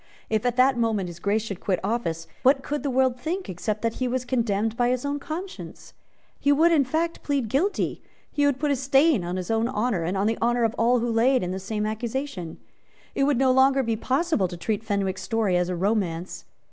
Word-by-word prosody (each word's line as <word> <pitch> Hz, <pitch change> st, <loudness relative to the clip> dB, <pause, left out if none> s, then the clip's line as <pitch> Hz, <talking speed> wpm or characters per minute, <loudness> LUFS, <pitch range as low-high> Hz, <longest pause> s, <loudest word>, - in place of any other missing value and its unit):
If 220 Hz, +2 st, +1 dB
at 245 Hz, -, 0 dB
that 255 Hz, 0 st, +4 dB
moment 215 Hz, -6 st, 0 dB
His 170 Hz, 0 st, -10 dB
Grace 205 Hz, +2 st, 0 dB
should 200 Hz, -4 st, -6 dB
quit 190 Hz, -3 st, -1 dB
office, 190 Hz, -7 st, -2 dB, 0.2 s
what 270 Hz, +1 st, +4 dB
could 295 Hz, 0 st, -3 dB
the 280 Hz, -, -2 dB
world 260 Hz, -1 st, +1 dB
think, 355 Hz, +7 st, -3 dB
except 210 Hz, +5 st, -3 dB
that 230 Hz, 0 st, -1 dB
he 255 Hz, -, -1 dB
was 250 Hz, 0 st, -2 dB
condemned 225 Hz, -3 st, 0 dB
by 245 Hz, 0 st, +2 dB
his 255 Hz, +1 st, -1 dB
own 285 Hz, 0 st, -2 dB
conscience? 350 Hz, +7 st, -8 dB, 0.5 s
He 285 Hz, -, +2 dB
would, 320 Hz, +4 st, +4 dB
in 295 Hz, -5 st, +4 dB
fact, 330 Hz, +5 st, -1 dB
plead 275 Hz, -6 st, -1 dB
guilty; 345 Hz, -, 0 dB, 0.3 s
he 290 Hz, -1 st, +2 dB
would 280 Hz, -3 st, +1 dB
put 295 Hz, 0 st, 0 dB
a -, -, +3 dB
stain 270 Hz, -, +3 dB
on 175 Hz, +1 st, -3 dB
his 185 Hz, +2 st, -3 dB
own 225 Hz, +1 st, +1 dB
honour, 215 Hz, -5 st, 0 dB
and 175 Hz, +4 st, -2 dB
on 195 Hz, -, +1 dB
the 225 Hz, +1 st, 0 dB
honour 240 Hz, +1 st, +2 dB
of 225 Hz, -1 st, +1 dB
all 240 Hz, +1 st, +3 dB
who 240 Hz, 0 st, -1 dB
lay 235 Hz, +4 st, +3 dB
under 180 Hz, -8 st, 0 dB
the 190 Hz, +1 st, -3 dB
same 210 Hz, +2 st, -3 dB
accusation. 220 Hz, -, -4 dB, 0.6 s
It 275 Hz, -, +1 dB
would 285 Hz, -3 st, +2 dB
no 260 Hz, 0 st, +4 dB
longer 265 Hz, +1 st, +4 dB
be 230 Hz, -2 st, 0 dB
possible 265 Hz, -, 0 dB
to 175 Hz, -, -8 dB
treat 210 Hz, +4 st, -2 dB
Fenwick's 200 Hz, -3 st, -1 dB
story 220 Hz, -5 st, 0 dB
as 180 Hz, 0 st, +1 dB
a 180 Hz, -, -1 dB
romance. 185 Hz, -2 st, -2 dB
235 Hz, 225 wpm, -25 LUFS, 205-270 Hz, 0.6 s, that